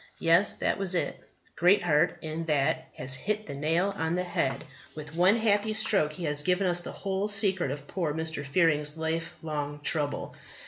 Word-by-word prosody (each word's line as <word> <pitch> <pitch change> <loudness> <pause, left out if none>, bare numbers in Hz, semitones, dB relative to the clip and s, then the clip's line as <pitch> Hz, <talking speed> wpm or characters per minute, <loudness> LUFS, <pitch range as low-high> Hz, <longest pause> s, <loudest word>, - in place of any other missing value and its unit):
Yes, 170 +4 +5
that - - -1
was 190 -2 +2
it. 170 - -1 0.4
Greatheart 175 -4 +3
in 160 +1 -4
that 145 -4 0
has 130 +1 -1
hit 210 +10 -2
the - - -7
nail 165 +7 0
on 160 0 -1
the 180 - 0
head. 135 -6 -1 0.3
With 150 -1 -8
one 180 +5 +4
happy 215 -1 +1
stroke 195 -8 +2
he 175 - -7
has 150 -2 -1
given 180 +4 +1
us 175 -1 +1
the - - -7
whole 195 +1 -2
secret 200 -6 +1
of 140 +1 -5
poor 170 -5 -2
Mr. 160 -1 -3
Fearing's 150 0 +1
life 165 +1 -2
long 145 -2 -4
trouble. 145 -1 -2
165 Hz, 180 wpm, -28 LUFS, 150-190 Hz, 0.4 s, Yes